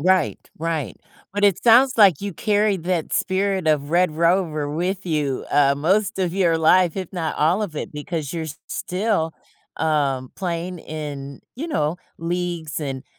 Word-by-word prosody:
Right, 185 +3 +2 0.2
right, 155 - -2 0.4
but 205 +1 -2
it 200 -3 +3
sounds 250 +3 +6
like 195 -9 +6
you 200 -2 -4
carry 210 +2 +2
that 170 -1 -2
spirit 190 -1 0
of 150 -2 +2
Red 175 +1 +3
Rover 165 -3 +1
with 185 +5 -2
you, 150 -5 -1
uh, 140 -1 +4
most 195 +8 +1
of 180 -2 0
your 170 -4 +2
life, 175 +2 +4
if 185 -3 -5
not 165 -3 -2
all 170 +8 +2
of 175 -7 -4
it, - - -5
because 150 0 -4
you're 165 -2 -3 0.2
still, 180 -4 -1 0.5
um, 140 -5 0
playing 175 0 -3
in, 145 -3 -7
you 290 +7 -5
know, 155 - 0 0.2
leagues 170 -3 -3
and 135 -3 -4
170 Hz, 160 wpm, -22 LUFS, 150-190 Hz, 0.5 s, sounds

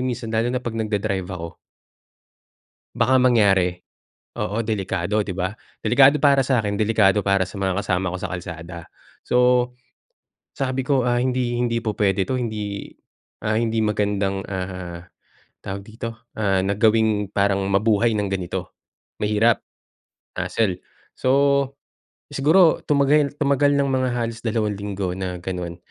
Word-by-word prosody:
minsan 125 -3 -3
lalo 115 +1 +1
na 125 - -1
'pag 120 -2 -5
nagda-drive 105 -4 -2
ako 85 -3 -7 1.4
baka 130 0 +3
mangyari. 100 -8 +4 0.6
Oo, 105 +1 -2
delikado, 100 -1 -1
'di 100 - -5
ba? 95 +2 -2 0.3
Delikado 135 +3 +5
para 140 -1 +5
sa'kin, 115 -6 0
delikado 105 -2 +3
para 100 -1 +2
sa 95 - -11
mga 95 -1 0
kasama 90 -2 -1
ko 90 - -4
sa - - -4
kalsada. 85 -1 -7 0.5
So, 125 0 +3 0.8
sabi 130 -1 -2
ko, 135 -3 +2
ah, 120 0 +2
hindi 125 -1 0
hindi 115 -1 0
pu 110 -2 -2
puwede 95 -2 +2
to. 130 - -1
Hindi, 105 -4 -4 0.5
ah, 110 0 +1
hindi 115 -1 0
magandang, 100 -2 0
ah, 90 -2 -6 0.6
tawag 100 +1 -5
dito, 115 +2 -8
ah, 95 -3 +2
na 100 +1 0
gawing 110 -2 +2
parang 100 -1 +1
mabuhay 110 +3 +2
ng 105 -1 -1
ganito. 95 -3 -4 0.5
Mahirap. 105 +2 +2 0.8
Hassle. 95 -5 -1 0.3
So, 140 +1 +2 0.6
siguro 160 +5 +4
tumagal 145 0 +3
tumagal 145 0 +3
ng 140 -1 +1
mga 130 -1 +1
halos 115 -1 -3
dalawang 110 -2 0
linggo 100 -2 -3
na 90 -1 -4
gano'n 90 -2 -5
110 Hz, 135 wpm, -22 LUFS, 95-125 Hz, 1.4 s, Delikado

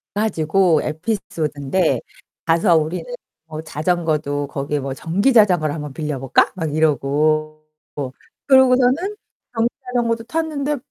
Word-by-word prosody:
가지고 180 -5 +2
에피소드인데 160 -2 -1 0.5
가서 165 +1 +3
우리는 160 +3 -2 0.4
뭐 155 -1 -7
자전거도 155 -3 -1
거기에 145 +1 -3
뭐 135 0 -4
"전기 195 - +1
자전거를 180 -10 +4
한번 150 -3 -6
빌려 150 -3 -4
볼까?" 135 0 +2
막 160 -5 -3
이러고 155 +1 +1 0.8
그러고서는 265 +8 +4 0.4
전기 230 +1 +2 0.2
자전거도 235 -2 0
탔는데 295 0 -2
160 Hz, 290 characters per minute, -20 LUFS, 150-225 Hz, 0.8 s, 자전거를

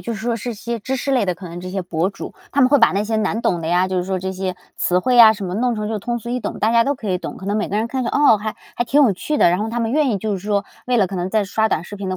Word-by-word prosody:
就 235 - -4
是 215 - -7
说 240 -1 0
是 235 +1 -5
些 235 +2 -4
知 260 +5 -3
识 270 +2 -3
类 255 -6 +2
的， 180 - 0
可 180 +2 -10
能 170 +1 -8
这 185 +1 -7
些 190 0 -3
博 175 0 -1
主， 195 - -8 0.2
他 285 - +2
们 255 - +4
会 285 - +6
把 230 - +5
那 200 +2 0
些 220 +1 -1
难 215 +1 -1
懂 175 - +1
的 160 - -5
呀， 175 +2 +2
就 185 - -2
是 180 - -1
说 190 0 -2
这 190 +1 -4
些 185 -1 -4 0.2
词 180 - +1
汇 250 +7 +1
呀 225 -2 +9
什 205 -2 -6
么 180 - -4
弄 240 +3 0
成 210 -1 -3
就 220 -1 -2
通 240 +3 -3
俗 235 +1 -7
易 250 - -1
懂， - - -5
大 220 - +2
家 230 0 +4
都 280 - 0
可 220 -6 -5
以 180 - 0
懂。 - - -7
可 - - -10
能 200 +2 -1
每 215 - -1
个 205 - -2
人 220 +2 0
看 260 +1 -2
着， - - -1
哦， 280 -7 +4
还 215 +1 -4 0.2
还 240 - 0
挺 285 +5 +3
有 240 -7 +4
趣 300 +11 -3
的， 175 - +5
然 180 - +1
后 215 +2 -2
他 235 +2 -3
们 225 -1 -1
愿 295 -2 +2
意 215 - 0
就 215 +2 -2
是 195 - -2
说， 200 +1 -1 0.2
为 250 0 +1
了 205 -4 +3
可 190 +1 -6
能 180 +1 -2
在 215 +1 +1
刷 220 +3 0
短 160 - 0
视 205 - -9
频 195 -1 -5
的 185 - -2
215 Hz, 400 characters per minute, -20 LUFS, 190-235 Hz, 0.2 s, 呀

